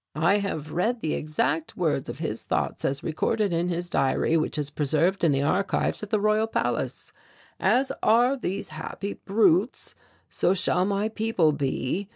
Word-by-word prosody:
"I 175 +7 +3
have 160 -7 -4
read 225 +7 0
the 155 - -1
exact 155 +1 -1
words 155 -6 0
of - - -5
this - - -3
thoughts - - -2
as 135 0 -1
recorded 200 +5 0
in 170 +1 0
his 175 0 -2
diary 155 +1 +1
which 155 -1 0
is 145 -1 -3
preserved 155 +6 +1
in 165 - +5
the 135 0 +1
archives 190 +7 0
of 210 - -6
the 215 - +1
Royal 215 +1 +2
Palace: - - -2 0.5
'As 265 +2 +2
are 240 +4 +4
these 195 -7 -4
happy 160 +6 -5
brutes, 200 +1 +1 0.3
so 185 - +1
shall 180 0 +2
my 200 +1 0
people 220 -7 +1
be. 145 +6 -2
180 Hz, 170 wpm, -26 LUFS, 155-210 Hz, 0.5 s, in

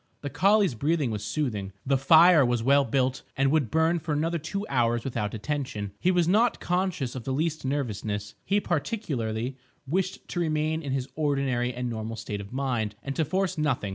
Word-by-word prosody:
The 145 - -5
collie's 195 - +3
breathing 145 +1 0
was 105 -1 -4
soothing. 105 -4 -2
The 135 +1 +2
fire 160 +4 +7
was 120 -2 +1
well 140 +3 +5
built, 130 +2 0 0.2
and 135 0 +3
would 150 -7 +2
burn 160 +4 +2
for 155 0 -3
another 165 +3 0
two 195 +7 -4
hours 120 -3 +1
without 105 -5 -3
attention. 125 -4 -3
He 180 - +2
was 175 -2 +3
not 220 +6 +3
conscious 180 -8 -1
of 130 - -6
the 135 - -3
least 155 +2 -1
nervousness. 105 -7 -2
He 200 +1 +2
particularly 135 - -2 0.3
wished 185 +6 -2
to 175 - -3
remain 155 -1 0
in 140 -4 -4
his 130 -1 -1
ordinary 135 -5 0
and 125 0 -4
normal 115 -1 -4
state 105 -2 -5
of 100 - -11
mind, 120 -6 -1
and 135 0 -4
to 160 - +2
force 185 +2 -1
nothing. 130 -9 0
140 Hz, 190 wpm, -27 LUFS, 120-160 Hz, 0.3 s, fire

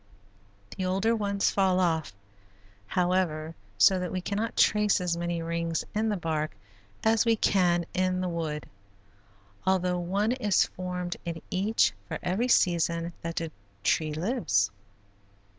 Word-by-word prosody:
The 185 - -3
older 195 +5 +1
ones 200 -2 +1
fall 190 -2 +2
off, 160 - +1 0.8
however, 175 - 0 0.2
so 185 - +5
that 180 -1 -3
we 185 - -1
cannot 205 +5 -3
trace 210 -1 +4
as 180 -2 0
many 170 -1 -2
rings 165 0 -2
in 220 +1 +1
the 210 - 0
bark 160 -3 -2 0.5
as 220 -1 +4
we 230 -1 +3
can 175 -5 +2
in 185 0 +1
the 185 - -1
wood, 160 -3 -3 1.0
although 180 -1 +1
one 195 +6 0
is 215 -7 +2
formed 180 -1 -5
in 165 -1 -4
each 205 +5 +2
for - - -3
every 200 +8 0
season 170 -5 +2
that 165 0 -4
the 165 -1 -3 0.3
tree 155 +7 +1
lives. 155 - +1
180 Hz, 140 wpm, -28 LUFS, 170-200 Hz, 1.0 s, so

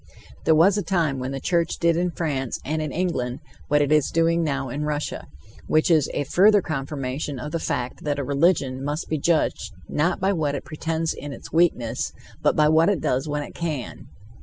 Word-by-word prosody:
There 160 - +5
was 190 +6 +5
a - - 0
time 165 -7 0
when 130 +1 -3
the 135 0 -4
church 170 +2 0
did 170 -1 +2
in 175 +1 +1
France 145 -7 -2
and 155 +2 -1
in 155 -2 -3
England 140 -8 -2 0.3
what 145 0 +3
it 145 - -1
is 150 -2 +4
doing 165 +1 +2
now 140 -3 -1
in 145 +5 -3
Russia, 150 - -3 0.4
which 155 +2 +3
is 155 -4 +4
a - - 0
further 200 +9 +5
confirmation 140 -3 -4
of 150 +5 -6
the 165 - -1
fact 125 -5 -3
that 145 -1 -1
a 140 - -2
religion 140 -2 +1
must 145 +3 -3
be 155 - -1
judged 140 -10 0
not 165 +4 0
by 195 +2 +2
what 150 -5 0
it - - -5
pretends 160 +1 -2
in 145 - -7
its - - -11
weakness, 160 -9 +1 0.3
but - - +3
by 150 0 +4
what 160 +3 +4
it 200 -5 +1
does 130 +3 0
when 145 0 -2
it - - -10
can. 155 -7 -5
150 Hz, 210 wpm, -24 LUFS, 140-165 Hz, 0.4 s, There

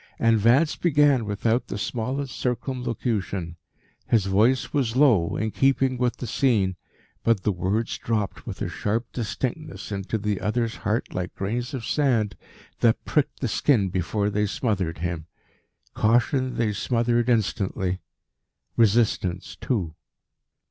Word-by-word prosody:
And 115 -1 +3
Vance 130 +9 +4
began 145 -7 +3
without 110 +4 0
the - - -4
smallest 125 +5 -3
circumlocution. 120 - -2 0.5
His 110 -5 +3
voice 110 +7 +2
was 125 -6 0
low, 125 - +4
in 110 0 -1
keeping 135 -1 +2
with 125 -1 0
the - - -5
scene, 105 -6 +1 0.5
but 115 -5 +2
the 105 - +2
words 95 +5 -1
dropped 110 -3 -2
with - - -4
a - - -1
sharp 110 +4 -1
distinctness 130 +5 -4
into 100 +2 -2
the 105 -2 -2
other's 115 +1 -1
heart 110 +1 -2
like 90 0 -4
grains 120 +7 -3
of 120 -4 -5
sand 120 -8 +1 0.4
that 115 -1 +2
pricked 150 -3 0
the 130 - +1
skin 110 -3 +2
before 100 +3 -1
they 105 +1 +1
smothered 95 - -1
him. 85 -1 -4 0.7
Caution 125 +3 +2
they 110 -3 0
smothered 120 +2 +1
instantly; 95 -4 0 0.8
resistance 105 -5 +2
too. 95 - -2
115 Hz, 135 wpm, -25 LUFS, 100-125 Hz, 0.8 s, Vance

